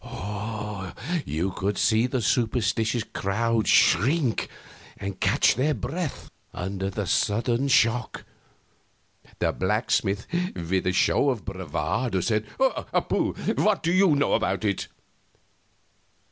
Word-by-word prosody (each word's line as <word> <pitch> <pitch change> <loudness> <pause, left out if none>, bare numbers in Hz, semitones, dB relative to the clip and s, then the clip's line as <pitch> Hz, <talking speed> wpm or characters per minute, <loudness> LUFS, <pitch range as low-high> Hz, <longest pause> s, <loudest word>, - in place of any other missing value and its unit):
You 85 +5 -1
could 100 +2 -2
see 110 +2 +3
the 125 -2 -2
superstitious 115 0 +1
crowd 110 +3 -1
shrink 125 - +3 0.5
and 100 -1 -6
catch - - +3
their 140 +5 +1
breath, 155 - -5 0.2
under 95 +1 -3
the 95 - -3
sudden 120 +5 +1
shock. 120 -2 +2 1.1
The - - +1
blacksmith, 100 +1 0 0.3
with 90 +2 -1
a - - +3
show 120 +8 +3
of 125 -5 -3
bravado, 95 - -2
said: 110 +2 0
"Pooh! 265 0 0 0.2
What 210 -2 +2
do 165 - +1
you 185 -4 +4
know 145 - +1
about - - 0
it?" 100 -2 -1
110 Hz, 110 wpm, -25 LUFS, 100-130 Hz, 1.1 s, you